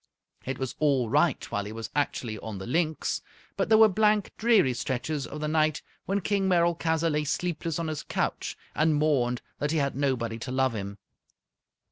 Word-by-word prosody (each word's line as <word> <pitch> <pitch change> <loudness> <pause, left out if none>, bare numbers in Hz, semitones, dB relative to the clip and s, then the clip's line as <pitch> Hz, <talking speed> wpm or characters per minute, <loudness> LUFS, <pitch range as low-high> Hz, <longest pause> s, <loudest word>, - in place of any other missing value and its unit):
It 135 0 -2
was 130 -2 -3
all 135 -6 +2
right - - +3
while 100 0 -1
he 105 - -6
was 115 0 -6
actually 120 -6 -1
on 110 -1 -6
the 95 - -6
Linx, 155 +4 0 0.3
but - - -1
there 220 - +7
were 220 0 +8
blank, 210 0 +2
dreary 220 - +4
stretches 130 +4 -2
of 150 - -7
the 150 - -1
night 155 -1 +1 0.2
when 200 +1 0
King 195 0 +1
Merolchazzar 170 -2 +2
lay 150 0 0
sleepless 165 +1 -2
on 165 -1 -2
his 155 -2 -3
couch - - -2 0.2
and 155 0 +2
mourned 135 -5 +1 0.2
that 145 - 0
he 160 - 0
had 140 -3 0
nobody 125 -5 -1
to 125 - -5
love 130 -1 +1
him. 100 -1 -5
150 Hz, 185 wpm, -27 LUFS, 125-165 Hz, 0.3 s, were